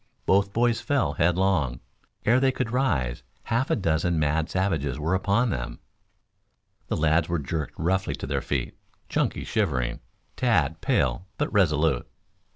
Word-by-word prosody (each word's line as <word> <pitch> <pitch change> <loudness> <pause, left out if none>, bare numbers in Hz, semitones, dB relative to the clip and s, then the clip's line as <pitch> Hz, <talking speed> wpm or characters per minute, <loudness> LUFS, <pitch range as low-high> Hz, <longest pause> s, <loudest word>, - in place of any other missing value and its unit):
Both 100 +1 +3
boys 115 +1 +1
fell 145 -2 +1
headlong. 90 -6 +1 0.5
Ere 120 +4 +5
they 135 0 +3
could 125 -3 -3
rise 70 - 0 0.2
half 120 +3 0
a - - +3
dozen 85 -2 +1
mad 80 +2 +1
savages 80 -9 0
were 80 +4 -1
upon 100 +5 +2
them. - - -4 1.1
The - - -1
lads 80 +2 +2
were 85 - +1
jerked 75 +1 -4
roughly 95 +3 0
to - - -6
their - - -1
feet, 65 -4 -2 0.3
Chunky - - 0
shivering, 70 - -1 0.4
Tad 80 - +1
pale 65 +8 +1
but - - -2
resolute. 75 -8 +2
85 Hz, 145 wpm, -26 LUFS, 75-105 Hz, 1.1 s, Ere